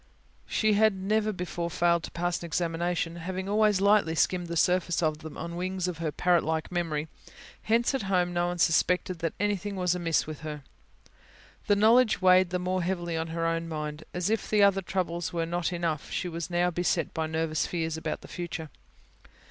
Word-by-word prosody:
She 215 -1 +2
had 215 0 +4
never 210 +3 0
before 175 -2 -4
failed 170 0 +2
to - - -8
pass 175 0 -2
an 170 - -6
examination, 170 +1 -1
having 185 +2 -4
always 210 -1 +3
lightly 200 -5 +4
skimmed 175 +2 +1
the 170 0 -3
surface 180 0 +2
of 155 -1 0
them 160 -1 -9
on 170 +1 -5
the 170 - -6
wings 185 0 -2
of 175 -3 -4
her 160 -2 -1
parrot 175 +2 +2
like 160 +1 -2
memory; 160 -4 -1 0.5
hence, 235 +4 +2
at 270 - 0
home 180 -3 +1
no 175 0 +1
one 175 0 -3
suspected 175 +2 +2
that 165 -1 -2
anything 205 0 -1
was 180 -2 +1
amiss 170 -3 +1
with 155 -1 -7
her. 150 -2 -6 1.0
The 205 - +4
knowledge 225 +3 +4
weighed 185 -1 +5
the 180 - -1
more 185 +1 -1
heavily 175 -1 -2
on 160 0 -2
her 165 0 -2
own 165 0 -1
mind. 150 -1 -4
And, - - -6
as 180 +4 0
if 225 - -1
her 210 -1 +4
other 195 -1 +4
troubles 175 -2 -2
were 165 -1 0
not 175 +1 -2
enough, 170 -4 -2
she 180 - -2
was 170 0 -5
now 175 0 +1
beset 175 -1 0
by 160 -1 -1
nervous 160 0 -1
fears 165 -2 -2
about 160 - -4
the - - -12
future. 170 -3 -5
175 Hz, 205 wpm, -28 LUFS, 165-185 Hz, 1.0 s, weighed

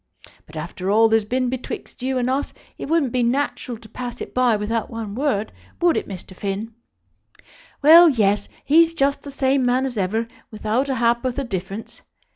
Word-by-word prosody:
But 155 - -15
after 175 +4 -5
all 220 +2 +5
there's 220 -1 +2
been 255 +3 0
betwixt 255 0 -6
you 260 +1 -1
and 245 -1 0
us 270 +2 -2 0.2
it - - -7
wouldn't 315 -6 +2
be 250 - 0
natural 245 -1 -1
to 220 - -15
pass 245 +1 -7
it - - -7
by 250 -3 +3
without 220 +2 -2
one 225 -3 -6
word; 245 -4 -1 0.3
would 345 -2 +3
it, - - -2
Mr. 190 -1 -9
Finn? 200 +4 -4 1.1
Well, 335 +3 +9
yes; 205 -6 +1 0.2
he's 330 +3 +4
just 280 -2 +1
the 285 - -9
same 270 -1 +1
man 250 +2 +2
as 250 -4 -4
ever, 220 +5 -1 0.2
without 220 +5 -1
a 265 - 0
ha'porth 240 +2 +1
of 275 -3 -3
difference. 195 +3 -6
240 Hz, 185 wpm, -22 LUFS, 215-270 Hz, 1.1 s, Well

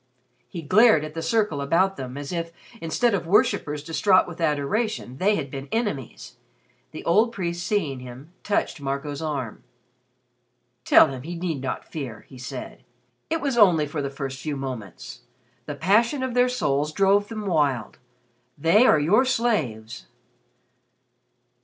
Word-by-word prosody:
He 170 -3 -7
glared 185 -1 +5
at 155 - -9
the 165 - -4
circle 210 -7 0
about 180 +7 +2
them 130 -4 -7
as 145 +2 -6
if, 170 -1 -3 0.3
instead 225 +8 +1
of 185 -4 -2
worshippers 150 -6 +1
distraught 185 +4 +3
with 175 -1 -9
adoration, 150 - -1
they 205 +6 +2
had 140 -6 -4
been 135 0 -6
enemies. 205 - -4 0.5
The - - -10
old 215 +7 +3
priest 175 -5 -4
seeing 155 -12 -1
him, 125 +6 -11
touched 200 -7 -1
Marco's 140 +1 -4
arm. 140 -8 -4 1.2
"Tell - - +7
him 130 -2 -6
he 170 +6 -6
need 165 -5 -3
not 130 - -4
fear," 135 -8 -7
he 130 - -12
said. 125 +1 -8 0.5
"It 325 +1 -1
was 270 -4 0
only 175 -7 +5
for 150 +1 -4
the 140 - -3
first 135 -1 -6
few 150 -1 -3
moments. 125 -1 -7 0.5
The 150 - -4
passion 230 - +2
of 260 -2 -2
their 250 +1 +3
souls 150 - 0
drove 200 +3 +3
them 215 -2 -6
wild. 145 - 0 0.6
They 180 - +4
are 155 - +5
your 185 - +4
slaves." 185 - -1
160 Hz, 155 wpm, -24 LUFS, 140-205 Hz, 1.2 s, Tell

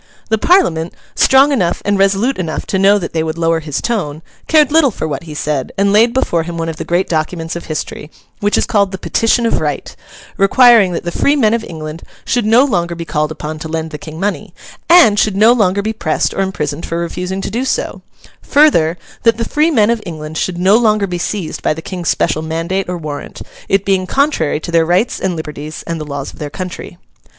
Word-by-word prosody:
The 220 0 +1
Parliament, 175 - +2 0.2
strong 270 +2 +5
enough 185 -11 0
and 205 0 +1
resolute 195 +6 +2
enough 165 -3 -3
to 190 - -1
know 200 +2 +5
that 180 - -5
they 160 - 0
would 160 0 -3
lower 165 0 +1
his 150 -3 -4
tone, 165 -10 -3 0.2
cared 300 -3 +4
little 315 -3 +5
for 190 - -4
what 150 +1 -5
he 155 -2 -8
said, 145 -2 -2
and 200 +1 +2
laid 225 +3 +5
before 235 -9 0
him 170 +1 -6
one 165 0 -2
of 160 - -6
the - - -4
great 175 +2 0
documents 165 +1 -2
of 170 - -6
history, 155 -1 -5 0.3
which 205 0 +1
is - - +2
called 200 -3 +1
the 190 - -5
Petition 230 +4 +1
of 230 - +1
Right, 150 -3 -3 0.4
requiring 215 -1 +5
that - - -3
the 175 - -3
free 285 +10 +2
men 225 -6 +3
of 230 -1 -1
England 155 -3 -7 0.2
should 240 -4 0
no 235 +5 +5
longer 175 -9 -1
be 170 0 -6
called 155 -1 -1
upon 155 0 -6
to 160 - -6
lend 160 0 -4
the 150 - -7
King 155 +2 -9
money, 205 +2 -3 0.3
and 335 -13 +6
should 200 -2 +1
no 220 +3 +6
longer 200 -4 +1
be 220 +1 -2
pressed 170 -7 -1
or - - -1
imprisoned 155 -5 -3
for 165 - -3
refusing 180 +2 -3
to - - -4
do 240 +3 -1
so; 265 - -2 0.4
further, 180 - +3 0.2
that 230 -2 +3
the 230 - -2
free 300 +6 +1
men 230 -8 +3
of 235 -2 -1
England 155 -3 -7
should 175 +2 -2
no 190 +4 +4
longer 215 -3 +2
be 180 -2 -4
seized 185 -2 -4
by - - 0
the - - -7
King's 180 -4 -4
special 155 - 0
mandate 165 +4 -2
or 180 - -2
warrant, 150 -3 -7 0.3
it 195 0 +2
being 190 -2 +1
contrary 270 - +1
to 170 - -6
their 165 -1 +4
rights 180 +8 +1
and 185 -2 -1
liberties 155 -1 -7
and 165 -1 -4
the - - -5
laws 140 -2 -6
of - - -16
their 150 - -4
country. 180 +1 -7
180 Hz, 225 wpm, -15 LUFS, 160-215 Hz, 0.4 s, and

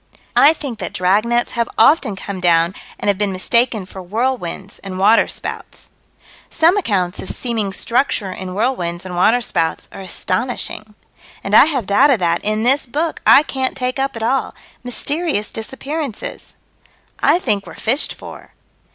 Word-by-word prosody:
I 300 - +7
think 275 -8 -7
that 180 - -5
dragnets 215 +7 +1
have 235 -1 -1
often 225 -3 +4
come 195 0 -6
down 170 0 +3 0.2
and - - -5
have 200 -1 +2
been 205 -2 0
mistaken 220 +2 +1
for 190 +1 -10
whirlwinds 200 -2 -3
and 190 -1 -7
waterspouts. 210 +4 0 0.6
Some 330 +3 +3
accounts 190 - -1
of - - -5
seeming 225 -5 -2
structure 230 -2 0
in 185 0 -6
whirlwinds 190 -7 -1
and 180 -1 -6
waterspouts 180 -4 +1
are - - -9
astonishing. 215 +2 -3 0.5
And - - 0
I - - +9
have 275 -8 -1
data 260 +7 +4
that, 170 -3 0
in 215 +1 0
this 265 +3 +3
book, 310 +6 -2
I 285 - +8
can't 265 -3 -2
take 255 0 -2
up 270 -1 -1
at 225 - -5
all 260 +3 0 0.3
mysterious 280 -1 -2
disappearances. 265 +3 -5 0.6
I - - +4
think 210 - -1
we're - - -10
fished 255 +7 -1
for. - - -12
220 Hz, 150 wpm, -18 LUFS, 190-265 Hz, 0.6 s, I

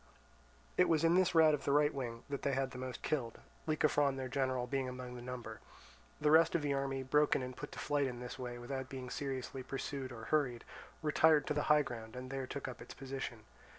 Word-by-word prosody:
It 180 - +5
was 160 -1 +3
in 165 +1 +5
this 185 -1 +3
rout 160 -1 +7
of 150 - -1
the - - +1
right 150 +1 +4
wing 120 -4 -4
that 140 -1 -4
they 140 - 0
had 135 0 0
the 125 - -7
most 130 -2 -5
killed, 120 -7 -1 0.3
Lycophron 145 -3 +3
their 130 -1 -3
general 130 -2 0
being 130 0 -1
among 125 -1 -7
the 125 - -7
number. 120 -3 -6 0.6
The 150 0 +3
rest 165 +1 +6
of 165 - +1
the 145 -1 +1
army, 135 -1 -1
broken 145 0 +3
and 125 0 -6
put - - -7
to - - -9
flight 145 -2 +1
in 125 -2 -5
this 125 +1 -7
way 120 -1 -4
without 130 +2 -5
being 130 -2 -6
seriously 135 -1 -3
pursued 135 0 -4
or 115 -2 -8
hurried, 135 -4 +1 0.4
retired 155 -1 +5
to - - 0
the 150 - +1
high 150 0 +6
ground 115 -3 -7
and 130 +1 -6
there 135 -1 -3
took 140 - -5
up - - -7
its - - -9
position. 135 -4 -5
135 Hz, 225 wpm, -35 LUFS, 125-150 Hz, 0.6 s, rout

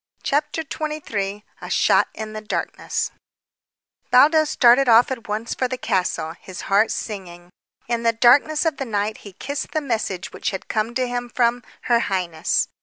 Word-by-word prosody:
CHAPTER 300 +3 0
XXIII 225 -11 -4 0.2
A - - -7
SHOT - - +3
IN 220 0 -6
THE 215 - -5
DARKNESS 215 - -3 1.0
Baldos 305 +4 +5
started 250 -1 +5
off 230 +3 +6
at 240 -3 -5
once 215 +2 -3
for 255 - -1
the 255 0 -4
castle, 185 -7 -1
his 185 -2 -8
heart 205 +3 +3
singing. 175 -4 -6 0.4
In 235 0 -1
the 230 0 +3
darkness 270 +7 +4
of 315 -4 0
the 270 - -3
night 215 -1 -2
he 200 - -12
kissed 285 +9 -5
the 310 - +2
message 225 -9 -3
which - - -2
had 190 - -6
come 220 +2 -2
to 255 0 0
him 245 0 -3
from 240 0 +1 0.2
"her 235 -1 +3
highness." 180 -7 0
230 Hz, 170 wpm, -22 LUFS, 205-260 Hz, 1.0 s, off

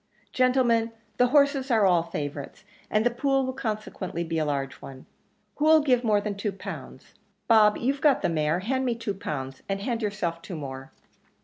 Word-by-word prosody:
Gentlemen, 245 -3 +2 0.2
the 250 - +4
horses 280 0 +3
are 220 -4 +4
all 180 -3 +4
favourites, 145 -4 -6 0.3
and 215 +1 +1
the 245 - +3
pool 270 +2 +1
will 260 - -3
consequently 215 -8 -4
be 165 -1 -2
a 155 - 0
large 135 -2 -2
one. 130 -1 -11 0.5
Who'll 315 +1 +5
give 255 -4 +2
more 215 -3 +3
than 205 0 -3
two 200 0 -3
pounds? 195 - -9 0.3
Bob, 215 -2 +5
you've 275 +4 -1
got 295 -4 +3
the - - +3
mare; 155 +1 0
hand 260 +6 -1
me 245 -2 0
two 225 -3 -3
pound, 135 -8 -5
and 195 0 -1
hand 230 +3 -2
yourself 190 -6 -2
two 180 - -7
more." 135 -3 -7
210 Hz, 185 wpm, -26 LUFS, 165-255 Hz, 0.5 s, Who'll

